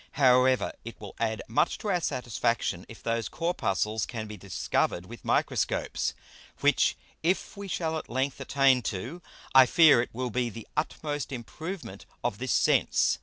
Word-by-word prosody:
However 130 -1 +4
it 115 - -9
will 105 -2 -9
add 110 -1 -1
much 115 - +1
to 210 - -4
our 180 -3 +1
Satisfaction, 115 - -1
if 115 - -12
those 115 -1 -1
Corpuscles 110 - -1
can 115 -3 -5
be 105 0 -8
discover'd 90 -2 -1
with 115 +4 -11
Microscopes; - - 0 0.5
which - - +3 0.2
if 175 +4 0
we 200 0 -7
shall 165 -3 -1
at - - -12
length 130 +3 -1
attain 135 -2 +3
to, 120 - -6 0.3
I 130 -1 +8
fear 155 -5 +7
it 120 - -4
will 125 +1 -3
be 125 +1 0
the 115 0 -9
utmost 145 -3 -2
improvement 155 - -7 0.2
of - - -1
this - - -2
Sense. - - +3
125 Hz, 160 wpm, -28 LUFS, 115-150 Hz, 0.5 s, I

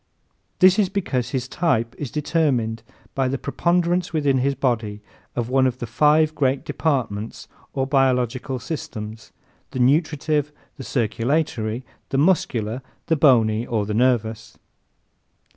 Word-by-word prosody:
This 185 +2 +6
is 195 -3 +3
because 135 - -2
his 130 -2 -2
type 125 -8 0
is 145 - -4
determined 135 -7 0 0.3
by 135 -1 +1
the 135 +2 -1
preponderance 175 +3 0
within 145 -5 +2
his 140 +2 +1
body 115 -6 -1 0.4
of 120 -2 -1
one 130 +1 +3
of 125 -1 -2
the 120 - -4
five 150 +6 +3
great 135 -3 0
departments 130 -8 -2 0.3
or 135 - 0
biological 130 -1 +1
systems 110 -5 -6 0.4
the - - -7
nutritive, 150 +2 +2 0.3
the 135 - -7
circulatory, 120 0 -1 0.2
the 135 - -1
muscular, 130 - +1 0.2
the 160 - +2
bony 115 -7 +4
or 110 -4 -1
the 105 - -3
nervous. 115 -2 0
130 Hz, 130 wpm, -22 LUFS, 115-150 Hz, 0.4 s, This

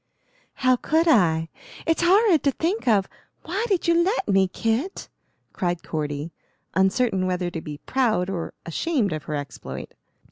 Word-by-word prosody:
"How 255 -1 +3
could 320 +6 +1
I? 165 - +4 0.4
It's 325 0 +1
horrid 370 -1 +5
to 280 - +4
think 340 - -2
of. 205 -4 +3 0.4
Why 380 +7 -2
did 385 -5 0
you 335 - +5
let 390 +7 0
me, 195 -2 +4
Kit?" 225 - -2 0.4
cried 175 -3 -2
Cordy, 150 0 -3 0.4
uncertain 190 0 +2
whether 180 -1 -1
to 165 - -5
be 150 -2 -7
proud 220 - 0
or 180 -4 -4
ashamed 220 - 0
of 155 - -5
her 150 - -3
exploit. 145 -1 -7
205 Hz, 150 wpm, -24 LUFS, -, 0.4 s, horrid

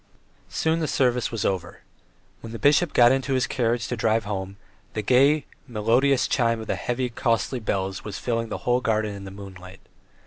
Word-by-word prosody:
Soon 160 +1 0
the 155 - -1
service 125 -4 +1
was 115 -4 -2
over. 90 -3 -2 0.6
When 115 0 -9
the - - -4
bishop 145 +6 +3
got 120 0 +6
into 135 0 0
his 130 +1 +2
carriage 120 -4 -1
to 120 - -2
drive 110 0 +1
home, 100 -1 -4 0.4
the 110 - -3
gay, 135 +6 +4 0.2
melodious 125 +4 +2
chime 115 -3 +1
of 110 - -6
the - - -1
heavy, 125 +1 -2
costly 115 +1 0
bells 95 -3 -2
was 105 -2 -6
filling 115 -1 -2
the - - -3
whole 125 0 +2
garden 110 -3 0
in 100 -1 -8
the - - -7
moonlight. 95 -1 -11
115 Hz, 185 wpm, -24 LUFS, 105-125 Hz, 0.6 s, got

